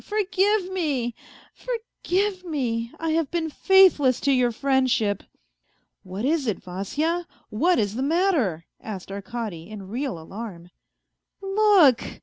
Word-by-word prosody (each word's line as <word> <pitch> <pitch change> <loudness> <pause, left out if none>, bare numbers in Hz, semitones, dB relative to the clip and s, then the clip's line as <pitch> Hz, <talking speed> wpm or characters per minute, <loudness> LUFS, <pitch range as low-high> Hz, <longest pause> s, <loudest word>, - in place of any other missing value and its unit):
Forgive 405 -1 +1
me, 280 -10 -1 0.4
forgive 415 -5 -2
me! 240 -8 -2
I 325 -1 -1
have 320 -3 0
been 325 -2 -2
faithless 365 -9 +5
to 280 - +2
your 250 -2 +3
friendship 250 -5 +1 0.3
..." - - -46
" - - -47
What 190 +4 -5
is 295 -2 +1
it, 215 - 0
Vasya? 295 - -3 0.2
What 340 +11 +2
is 205 -1 0
the 245 - -3
matter? 280 - +1
" - - -60
asked 195 -3 -7
Arkady, 200 -3 -6
in 200 -3 -9
real 250 -1 -3
alarm. 175 0 -9 0.4
" - - -59
Look 390 - +4
270 Hz, 140 wpm, -24 LUFS, 215-355 Hz, 0.4 s, faithless